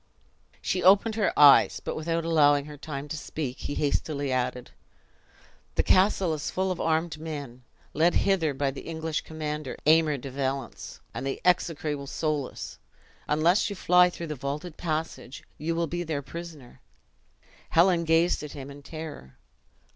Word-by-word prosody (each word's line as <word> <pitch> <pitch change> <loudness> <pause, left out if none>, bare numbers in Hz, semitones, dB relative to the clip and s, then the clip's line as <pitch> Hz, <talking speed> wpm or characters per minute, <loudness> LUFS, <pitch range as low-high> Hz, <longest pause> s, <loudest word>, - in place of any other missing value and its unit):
She 185 - 0
opened 200 +5 +5
her 215 -2 +1
eyes; 145 -2 +7
but, - - -5
without 165 +1 -2
allowing 145 -3 +4
her 150 0 -9
time 145 -1 -6
to 160 - -3
speak, 140 -3 -5
he 145 - -4
hastily 145 -1 -1
added; 125 -1 -2 1.0
"The - - +2
castle 185 -2 +3
is 150 -1 -3
full 190 0 -1
of 180 - -3
armed 160 -1 0
men, 145 -6 -7 0.3
led 165 +3 +3
hither 170 -8 +2
by 140 0 0
the 135 - -8
English 160 -1 -3
commander, 150 -3 -5
Aymer 155 -1 +4
de 135 +1 -8
Valence, 135 -2 -4
and - - -5
the 135 0 -3
execrable 155 -5 +1
Soulis. 150 -2 -3 0.5
Unless 165 +8 +3
you 200 - -5
fly 180 -1 +5
through 170 -1 -7
the 155 - -4
vaulted 145 +5 -5
passage, 155 -5 -4 0.2
you 165 +2 -1
will 170 0 +1
be 175 +2 -3
their 155 -4 -3
prisoner." 155 -3 -10 0.9
Helen 170 0 +4
gazed 165 +2 +2
at 150 -1 -7
him 140 -1 -8
in 140 +1 -11
terror. 150 - -9
155 Hz, 155 wpm, -27 LUFS, 140-170 Hz, 1.0 s, eyes